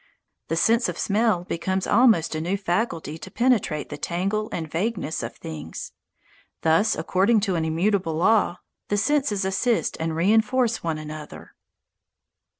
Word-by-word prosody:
The 165 - -1
sense 230 +7 +3
of - - -5
smell 210 -3 +1
becomes 185 +2 -2
almost 225 -12 +4
a 155 - -2
new 180 +5 -1
faculty 175 - -2
to - - -9
penetrate 235 - +1
the 150 - -7
tangle 195 +5 -1
and 160 -2 -3
vagueness 175 -1 -2
of 115 - -6
things. 80 0 -7 0.7
Thus, 165 +7 +3
according 195 +7 +2
to 195 -2 0
an 160 -1 0
immutable 170 +1 0
law, 185 +1 +3 0.3
the 205 - 0
senses 220 -4 +1
assist 210 +5 0
and 160 0 -2
reinforce 220 +6 +2
one 165 -2 -1
another. 155 0 -9
190 Hz, 145 wpm, -24 LUFS, 160-220 Hz, 0.7 s, almost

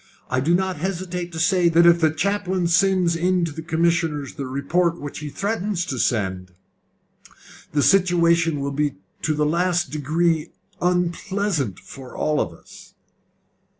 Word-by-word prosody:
I 130 - +2
do 160 +7 +2
not 190 -1 -1
hesitate 180 0 -4
to 165 - -6
say 175 +1 +3
that 170 +1 +5
if 170 0 +5
the 160 - +5
chaplain 185 +2 -1
sends 180 0 +3
in 180 +1 +1
to 165 - -4
the 160 +2 -7
commissioners 165 -3 0
the 140 -4 -5
report 165 +6 0
which 145 -1 -7
he 150 0 -6
threatens 200 +1 -2
to 130 -8 -4
send, 95 -6 -1 1.2
the 145 -1 +2
situation 170 -4 +3
will 140 0 -2
be 145 0 -1 0.3
to 155 - 0
the 150 0 +1
last 175 +2 +1
degree 155 +2 0 0.3
unpleasant 180 - -1
for 130 -2 -12
all 150 -1 +1
of 85 - -2
us." 80 - -16
170 Hz, 150 wpm, -22 LUFS, 150-180 Hz, 1.2 s, that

